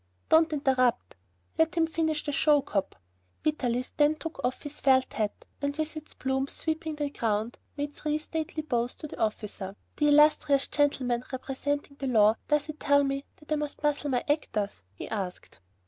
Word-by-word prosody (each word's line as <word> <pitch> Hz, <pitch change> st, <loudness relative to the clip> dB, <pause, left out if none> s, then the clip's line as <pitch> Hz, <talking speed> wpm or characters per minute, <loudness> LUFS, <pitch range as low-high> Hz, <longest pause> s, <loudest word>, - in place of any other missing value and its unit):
"Don't 320 Hz, 0 st, +5 dB
interrupt!" 255 Hz, -, +1 dB, 0.4 s
"Let 320 Hz, +1 st, +3 dB
him 330 Hz, -1 st, +4 dB
finish 320 Hz, -2 st, -1 dB
the 295 Hz, -, -2 dB
show, 295 Hz, 0 st, +4 dB
cop!" 195 Hz, -2 st, -2 dB, 0.5 s
Vitalis 255 Hz, -5 st, 0 dB
then 300 Hz, 0 st, +4 dB
took 325 Hz, +1 st, -7 dB
off 250 Hz, -, -1 dB
his 290 Hz, 0 st, -6 dB
felt 260 Hz, -1 st, +3 dB
hat, 215 Hz, -2 st, -2 dB, 0.2 s
and 285 Hz, 0 st, -1 dB
with 310 Hz, 0 st, -1 dB
his 310 Hz, -1 st, -9 dB
plumes 265 Hz, +1 st, -1 dB
sweeping 315 Hz, -1 st, -3 dB
the 290 Hz, -1 st, -2 dB
ground, 220 Hz, -1 st, -1 dB, 0.2 s
he 290 Hz, -, -2 dB
made 290 Hz, 0 st, -4 dB
three 300 Hz, 0 st, -1 dB
stately 310 Hz, 0 st, -4 dB
bows 245 Hz, -4 st, -1 dB
to -, -, -8 dB
the -, -, -10 dB
officer. 210 Hz, -3 st, -2 dB, 0.2 s
"The 295 Hz, -, +3 dB
illustrious 295 Hz, -1 st, +5 dB
gentleman 255 Hz, -4 st, +1 dB
representing 280 Hz, +2 st, -3 dB
the 275 Hz, -, -3 dB
law, 215 Hz, -4 st, +5 dB
does 300 Hz, -1 st, +2 dB
he 310 Hz, -, -5 dB
tell 285 Hz, -1 st, +3 dB
me 275 Hz, 0 st, -2 dB
that 300 Hz, -, -18 dB
I 305 Hz, -, +3 dB
must 295 Hz, 0 st, -5 dB
muzzle 295 Hz, 0 st, +1 dB
my 250 Hz, -2 st, +1 dB
actors?" 210 Hz, -, -1 dB
he -, -, -7 dB
asked. 190 Hz, -, -5 dB
285 Hz, 180 wpm, -28 LUFS, 250-305 Hz, 0.5 s, Don't